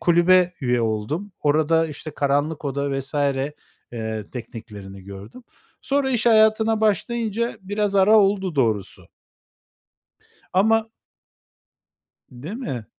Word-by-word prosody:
kulübe 180 +1 +4
üye 125 -2 +1
oldum. 115 - -2
Orada, 155 +2 +2
işte, 155 +1 -8
karanlık 145 +2 -1
oda 140 0 -2
vs. 135 +3 -8 0.8
eee, 110 -2 -5
tekniklerini 105 -5 -9
gördüm. 100 - -11 0.4
Sonra 275 -1 0
iş 240 -2 0
hayatına 220 0 +4
başlayınca 225 +2 0
biraz 205 +1 -1
ara 210 +3 +6
oldu 195 -4 +1
doğrusu. 110 -7 -1 1.4
Ama 220 +4 +3 1.4
Değil 140 - -8
mi? 135 - -5
160 Hz, 100 wpm, -22 LUFS, -, 1.4 s, ara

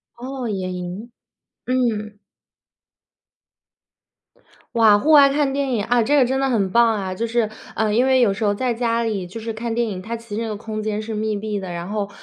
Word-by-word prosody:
哦， 255 +1 -5
野 185 -2 -3
营。 180 +6 -6 0.5
嗯。 220 -5 -1 2.6
哇， 215 -3 +6
户 310 +6 +1
外 285 -2 +8
看 275 -1 +1
电 275 -1 -1
影， 210 -4 0
啊， 240 0 +3
这 290 +5 +2
个 265 - +5
真 265 +2 0
的 270 0 +1
很 205 -6 +1
棒 235 +1 +5
啊， 190 -3 -3
就 230 - -2
是， 230 -2 0 0.3
呃， 220 -1 +1
因 245 +4 +3
为 260 -1 +4
有 205 -5 +4
时 195 - -4
候 205 -1 +2
在 245 +3 -1
家 230 0 0
里， 215 -5 -2
就 190 +6 -8
是 225 +1 -4
看 230 +1 -4
电 235 0 0
影， 190 -3 -5
它 230 +5 -5
其 230 -2 -8
实 225 - -2
那 230 - -2
个 215 - -3
空 215 0 -5
间 215 0 -2
是 220 0 -5
密 215 0 -1
闭 210 0 -3
的。 185 -2 -6
然 170 +2 -5
后 210 -1 -2
225 Hz, 230 characters per minute, -21 LUFS, 205-240 Hz, 2.6 s, 外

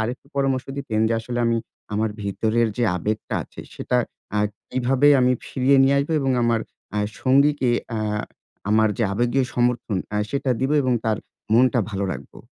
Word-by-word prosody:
আরেকটু 120 +5 -3
পরামর্শ 135 -2 +1
দিতেন, 110 -6 -2
যে 115 - 0
আসলে 120 +2 -4
আমি 115 0 +2 0.4
আমার 110 +1 0
ভিতরের 110 +3 +1
যে 120 - +1
আবেগটা 105 +5 -3
আছে, - - -11
সেটা 125 - -1 0.4
আ - - +2 0.3
কিভাবে 130 +3 +3
আমি 125 0 +4
ফিরিয়ে 135 +1 +2
নিয়ে 135 +1 +4
আসবো? 145 +4 -1
এবং 135 -1 0
আমার 115 -1 +2 0.4
আ - - +1 0.2
সঙ্গীকে 140 0 +3 0.3
আ - - -1 0.7
আমার 110 +1 +4
যে - - +1
আবেগীয় 120 +5 +1
সমর্থন, 120 -3 0 0.2
আ - - +1
সেটা 140 -1 -1
দিব? 130 - 0
এবং 130 -1 +1
তার 110 -2 +1 0.4
মনটা 125 +1 +4
ভালো 100 -1 -2
রাখবো? 70 -1 -10
120 Hz, 170 wpm, -23 LUFS, 110-135 Hz, 0.7 s, আমি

